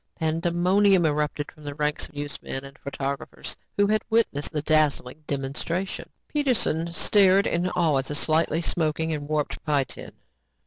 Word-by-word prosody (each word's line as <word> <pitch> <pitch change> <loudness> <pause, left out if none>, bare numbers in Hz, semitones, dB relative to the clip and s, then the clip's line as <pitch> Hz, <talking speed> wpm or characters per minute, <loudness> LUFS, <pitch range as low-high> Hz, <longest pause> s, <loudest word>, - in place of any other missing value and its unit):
Pandemonium 175 +4 +3
erupted 150 -1 -1
from 155 - -17
the 145 -1 -5
ranks 150 0 -1
of 150 - -23
newsmen 145 -2 -5
and 135 0 -12
photographers 140 0 -5 0.2
who 205 - +5
had 215 +1 +2
witnessed 220 -11 +1
the 150 -1 -2
dazzling 155 -2 +1
demonstration. 145 +7 -3 0.2
Peterson 240 - 0
stared 195 +2 +4
in 175 +2 0
awe 165 -6 +2
at 135 - -3
the 145 - -4
slightly 160 +2 +1
smoking 160 -1 0
and 145 -1 -5
warped 150 -1 -1
pie 145 -3 +2
tin. 130 - -10
155 Hz, 150 wpm, -25 LUFS, 145-175 Hz, 0.2 s, who